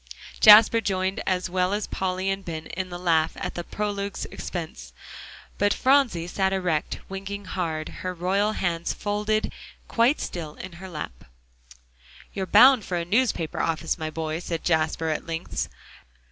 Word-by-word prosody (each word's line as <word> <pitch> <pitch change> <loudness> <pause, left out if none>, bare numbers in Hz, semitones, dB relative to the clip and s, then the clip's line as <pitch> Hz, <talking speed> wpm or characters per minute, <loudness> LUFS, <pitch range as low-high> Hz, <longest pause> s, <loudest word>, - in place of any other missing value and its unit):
Jasper 220 +2 +8
joined 190 0 -1
as 185 -1 0
well 185 +1 0
as 205 0 -1
Polly 190 0 -2
and 195 0 -3
Ben 160 -3 -6
in 190 -1 -5
the 175 - -6
laugh 165 -3 +2
at - - -4
the 175 - -4
prologue's 200 0 -3
expense, 170 -2 -6 0.7
but 205 0 +3
Phronsie 260 -11 +3
sat 190 +2 0
erect 180 -5 -1
winking 195 +1 -6
hard, 165 -4 -3
her 185 - -2
royal 190 +4 0
hands 170 -4 -1
folded 210 +1 -1 0.3
quite 240 +5 +3
still 160 -4 -5
in 185 - -8
her 190 - -8
lap. 150 - -7 1.1
"You're 190 -2 -3
bound 250 +3 +7
for 180 - -3
a 170 - -2
newspaper 200 -5 0
office, 165 0 -1
my 155 0 -3
boy," 160 0 -3
said 170 -2 -4
Jasper 160 -1 +1
at 155 - -3
length. 165 +1 -3
185 Hz, 155 wpm, -25 LUFS, 165-205 Hz, 1.1 s, Jasper